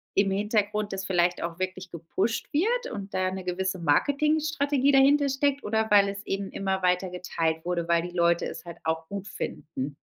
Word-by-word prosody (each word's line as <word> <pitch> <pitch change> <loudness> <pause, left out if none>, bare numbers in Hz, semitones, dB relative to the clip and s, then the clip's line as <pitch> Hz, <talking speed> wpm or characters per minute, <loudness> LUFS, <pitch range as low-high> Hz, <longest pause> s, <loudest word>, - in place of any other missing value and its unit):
im 195 0 +3
Hintergrund 210 +1 0
das 195 0 -4
vielleicht 175 -1 +1
auch 170 0 -4
wirklich 185 0 -4
gepusht 175 - -2
wird 470 +11 +1
und 200 0 -6
da 185 0 0
'ne 190 0 -5
gewisse 185 +1 -2
Marketingstrategie 285 - +2
dahinter 280 +2 +5
steckt 280 +1 0
oder 220 +1 0
weil 200 -1 +6
es 200 +1 -6
eben 195 0 -3
immer 190 -1 -2
weiter 180 +1 +2
geteilt 165 -2 -2
wurde, 175 -1 -1
weil 170 0 +3
die 175 0 -7
Leute 170 -1 +3
es 160 - -7
halt 170 -1 -8
auch 160 0 -1
gut 200 0 -5
finden? 140 -7 -5
190 Hz, 185 wpm, -27 LUFS, 175-225 Hz, -, weil